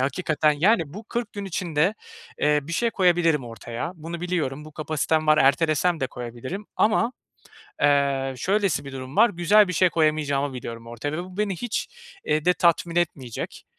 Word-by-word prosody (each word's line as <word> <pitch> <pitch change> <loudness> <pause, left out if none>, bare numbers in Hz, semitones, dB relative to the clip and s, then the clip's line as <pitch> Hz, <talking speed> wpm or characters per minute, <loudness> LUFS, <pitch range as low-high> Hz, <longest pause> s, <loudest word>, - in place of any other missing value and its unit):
hakikaten 150 +2 +1
Yani, 175 +7 +3
bu 210 +3 -8
40 235 +1 -4
gün 205 -1 -5
içinde, 175 -1 0 0.4
eee, 150 0 +3
bir 165 +4 -8
şey 235 +7 +1
koyabilirim 175 - +2
ortaya. 115 +5 -6
Bunu 165 +1 -7
biliyorum, 155 -6 -2
bu 155 - -12
kapasitem 155 0 -1
var, 155 0 +5
ertelesem 155 +4 +3
de 130 - +1
koyabilirim 125 - -7
ama, 225 +3 +2 0.7
eee, 140 -2 +2
şöylesi 195 - 0
bir 135 - -8
durum 130 +1 -7
var, 230 +3 +6
güzel 200 +3 +4
bir 180 - -2
şey 180 +2 +3
koyamayacağımı 150 -4 +1
biliyorum 115 -2 -7
ortaya 120 +5 -5
ve 175 +3 -3
bu 185 +1 -12
beni 205 -3 0
hiç, 235 +3 -3 0.4
eee, 150 0 0
de 180 +1 +4
tatmin 170 0 +1
etmeyecek. 140 -9 -3
155 Hz, 170 wpm, -24 LUFS, 140-180 Hz, 0.7 s, var